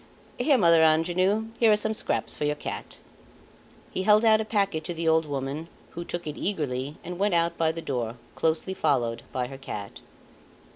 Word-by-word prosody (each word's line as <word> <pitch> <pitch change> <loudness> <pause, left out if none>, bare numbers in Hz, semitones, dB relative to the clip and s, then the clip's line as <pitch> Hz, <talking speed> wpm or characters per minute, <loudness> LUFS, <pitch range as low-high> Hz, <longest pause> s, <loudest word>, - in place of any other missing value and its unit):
"Here, 285 -4 +4
Mother 170 -6 +5
Angenoux, 180 +7 +2
here 230 -2 +5
are 210 - +5
some 215 +1 -1
scraps - - -1
for - - -4
your 150 0 +1
cat." - - -7 0.9
He - - -2
held 210 +3 +5
out 220 -1 +5
a - - -3
packet 200 -7 0
to 175 - -4
the 165 0 -2
old 160 -1 +3
woman, 140 +3 -4 0.2
who 170 - -6
took 175 0 -5
it 150 -1 -5
eagerly 145 -7 -2
and 180 +1 -6
went 200 -2 +2
out 170 0 +2
by 160 -1 +1
the 165 0 -7
door, 120 -4 -2 0.2
closely 165 +4 0
followed 120 -9 0
by 125 -1 -1
her 135 +1 -9
cat. 105 -7 -7
165 Hz, 190 wpm, -26 LUFS, 145-195 Hz, 0.9 s, Mother